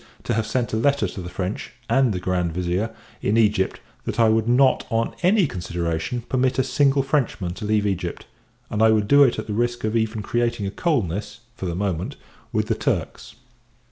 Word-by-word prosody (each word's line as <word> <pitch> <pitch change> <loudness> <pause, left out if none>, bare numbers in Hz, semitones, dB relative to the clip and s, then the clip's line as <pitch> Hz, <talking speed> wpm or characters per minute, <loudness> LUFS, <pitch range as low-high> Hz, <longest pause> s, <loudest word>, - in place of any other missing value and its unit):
_ - - -28
to 120 - -1
have 110 -1 0
sent 120 0 -1
a - - +2
letter 140 +5 +2
to 95 - -7
the 90 - -6
French, 95 +2 -4
and 135 -3 +3
the 90 - -2
Grand 90 -2 -1
Vizir, 90 +5 -1 0.3
in 105 +3 +1
Egypt, 105 -4 +2 0.3
that - - -3
I 115 -1 +6
would 110 +1 +2
not, 130 +2 +4
on 115 -1 0
any 190 +2 +4
consideration, 85 - -3
permit 130 +1 0
a 130 - +3
single 135 +1 +2
Frenchman 125 - -1
to 105 - -7
leave 105 0 +1
Egypt 90 -3 -2 0.5
and 105 - -1
I 110 - +6
would 105 -2 +2
do 140 +4 +6
it 130 -4 +5
at - - -4
the 105 - -4
risk 120 +2 -1
of 110 +1 -1
even 110 -1 0
creating 120 -1 0
a 95 - -2
coldness, 105 - -1
for 95 - -5
the 85 - -2
moment, 95 -3 -2 0.4
with - - 0
the - - 0
Turks. - - -3
110 Hz, 205 wpm, -23 LUFS, 95-125 Hz, 0.5 s, I